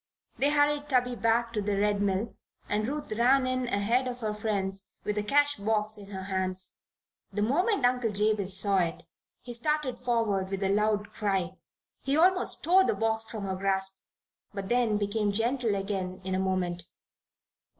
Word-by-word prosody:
They 280 - +4
hurried 290 0 +2
Tubby 250 -2 +2
back 230 0 +1
to 210 - -1
the 200 0 -1
Red 205 0 +1
Mill 200 +2 -1 0.3
and 215 +1 0
Ruth 290 -1 -4
ran 255 +5 +3
in 255 -1 -1
ahead 235 +4 +1
of 250 0 -5
her 215 -1 -1
friends 200 -2 -2 0.2
with 210 - -2
the 210 - 0
cash 290 +6 +3
box 215 +1 +1
in 205 -1 -8
her 190 -2 -6
hands. 185 -1 -2 0.5
The 205 +1 -1
moment 320 - +1
Uncle 245 -2 +2
Jabez 205 -2 +1
saw 200 -1 +3
it 170 -2 -2 0.4
he 245 - -7
started 300 +1 -1
forward 225 -6 0
with 195 0 -3
a 195 0 +2
loud 210 0 0
cry. 195 -4 -1 0.5
He 275 +2 0
almost 365 +3 +3
tore 370 +3 +5
the - - +1
box 225 0 0
from 220 -2 -5
her 190 -1 -2
grasp; 190 0 -1 0.6
but 195 -1 -5
then 240 -3 +2
became 205 0 0
gentle 230 +1 0
again 195 -2 -3
in 190 0 -3
a 185 - 0
moment. 180 -2 -2
210 Hz, 175 wpm, -28 LUFS, 195-245 Hz, 0.6 s, tore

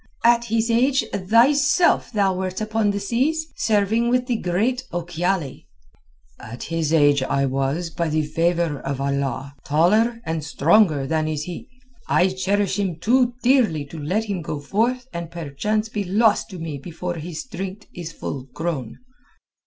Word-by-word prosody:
"At 235 0 +5
his 230 +1 0
age 260 +4 +3
thyself 270 - +3
thou 200 -4 +2
wert 185 0 -3
upon 215 0 0
the 200 0 -1
seas, 265 +10 0
serving 220 +2 +1
with 250 0 +2
the 245 -2 0
great 220 +8 0
Ochiali." 175 -3 -2 0.7
"At 115 +2 -8
his 165 -2 -2
age 145 -3 +4
I 140 +1 +1
was, 135 +6 -1
by 170 0 -2
the 155 0 +1
favour 165 -1 0
of 135 -1 -4
Allah, 140 0 -2
taller 210 - +2
and 160 -1 -2
stronger 155 -1 +3
than 155 +2 0
is 155 -1 -2
he. 175 +1 -8 0.4
I 185 - +3
cherish 195 +1 0
him 190 -4 -1
too 245 +8 +2
dearly 240 - +3
to 155 +3 -9
let 180 +9 -1
him 200 -5 -3
go 150 -1 -4
forth 230 - 0
and 170 -1 -5
perchance 170 +7 -2
be 210 -2 -3
lost 205 +4 +2
to 190 - -8
me 160 -4 -5
before 175 +3 -5
his 160 0 -5
strength 195 -2 -7
is 170 -2 -6
full 135 -5 -6
grown." 150 -9 -3
180 Hz, 160 wpm, -22 LUFS, 155-220 Hz, 0.7 s, At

